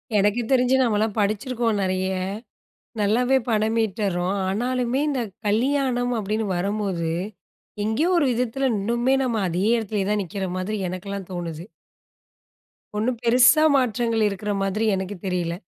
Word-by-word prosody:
எனக்குத் 210 +4 +2
தெரிஞ்சு 255 0 +4
நம்மலாம் 215 -2 +1
படிச்சிருக்கோம் 215 +1 0
நிறைய. 185 0 0 0.9
நல்லாவே 245 +6 +3
பணம் 220 +1 +1
ஈட்டுர்றோம். 195 -3 -1
ஆனாலுமே 245 +5 0
இந்தக் 240 -9 -3
கல்யாணம் 245 +2 +1
அப்படின்னு 215 +2 -2
வரும்போது, 195 -3 -1 0.8
எங்கயோ 225 +11 +1
ஒரு 290 - +3
விதத்துல, 250 +3 0
இன்னுமே 235 +6 +1
நம்ம 235 -4 0
அதே 180 +4 -1
இடத்துலயே 210 -3 -2
தான் 210 -1 +1
நிக்கிற 190 +2 -4
மாதிரி 200 +4 -2
எனக்கெல்லாம் 195 +1 -6
தோணுது. 170 -1 -5 1.3
ஒண்ணும் 230 +3 0
பெருசா 245 +5 +6
மாற்றங்கள் 235 -3 +1
இருக்கற 205 +1 -3
மாதிரி 210 +3 0
எனக்குத் 190 -1 -5
தெரியல. 180 -2 -1
215 Hz, 120 wpm, -23 LUFS, 195-245 Hz, 1.3 s, பெருசா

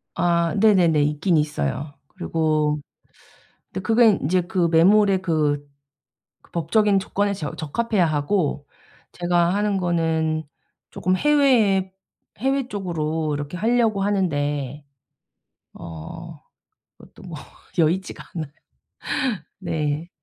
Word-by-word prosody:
아 170 -1 +1
네네네. 180 -8 +4
있긴 155 +4 +1
있어요. 145 - -2 0.2
그리고 155 -4 0 0.9
근데 - - -4
그게 225 +4 +4
인제 180 -1 +1
그 175 -2 0
매물에 195 +4 +5
그, 150 -5 0 0.7
그 - - -26
법적인 200 +3 +2
조건에 200 +1 -1
저 155 -7 -5
적합해야 195 +4 0
하고 150 0 0 0.5
제가 175 0 +1
하는 205 -1 0
거는 160 -3 0 0.5
쪼끔 185 +1 0
해외에 235 -10 +3 0.5
해외 270 +2 0
쪽으로 160 -5 -2
이렇게 145 +4 -5
하려고 225 0 +2
하는데 145 -8 -1 0.9
어 80 -2 -9 0.6
그것도 - - -17
뭐 - - -8 0.4
여의치가 175 +3 0
않아요. 155 -5 -5 1.1
네. 160 -3 -2
170 Hz, 225 characters per minute, -23 LUFS, 155-200 Hz, 1.1 s, 매물에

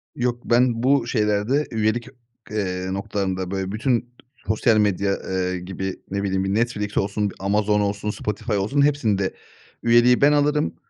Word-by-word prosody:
Yok 120 -1 -1
ben 120 -1 +2
bu 135 -2 +3
şeylerde 110 +5 +1
üyelik, 110 +1 0 0.4
eee, 95 -3 -2
noktalarında 95 -2 -3
böyle 95 -1 -3
bütün 120 +2 0 0.4
sosyal 110 +1 +3
medya, 100 -1 +1
eee, 95 -1 -1
gibi 95 +1 -5
ne 100 0 -1
bileyim, 95 -1 0
bir 95 0 -1
Netflix 105 -2 -1
olsun, 100 +1 0
bir - - -12
Amazon 105 +2 +1
olsun, 100 +1 -2
Spotify 105 +2 -3
olsun, 105 +8 +1
hepsinde 115 -10 +1 0.5
üyeliği 120 +1 +5
ben 145 +1 +6
alırım; 150 - +1
105 Hz, 150 wpm, -23 LUFS, 100-120 Hz, 0.5 s, ben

